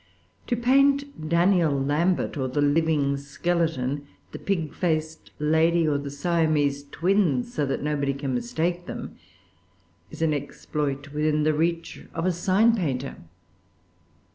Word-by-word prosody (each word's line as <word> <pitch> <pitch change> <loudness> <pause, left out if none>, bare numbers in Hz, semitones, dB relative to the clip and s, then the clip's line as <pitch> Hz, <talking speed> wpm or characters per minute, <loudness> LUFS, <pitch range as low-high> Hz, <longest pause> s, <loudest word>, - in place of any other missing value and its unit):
To 240 - +1
paint 275 - +2
Daniel 170 -1 +3
Lambert 155 +8 +1
or 135 -3 -1
the 130 +3 -2
living 145 -1 +2
skeleton, 145 -2 -1 0.2
the - - -7
pig 170 -6 -2
faced 160 -2 -2
lady 160 +2 +3
or 145 -2 +1
the 140 0 -5
Siamese 145 -2 +1
twins, 165 -6 +1
so 145 -2 0
that 135 - -2
nobody 145 -2 0
can 140 -2 -3
mistake 165 +9 -2
them, - - -6 0.9
is - - -5
an 155 -2 +2
exploit 145 0 -4
within 150 0 +1
the 155 0 +3
reach 165 +2 -1
of 165 +1 -1
a 185 - +3
sign 195 +6 +3
painter. 135 - -2
155 Hz, 135 wpm, -25 LUFS, 145-170 Hz, 0.9 s, Daniel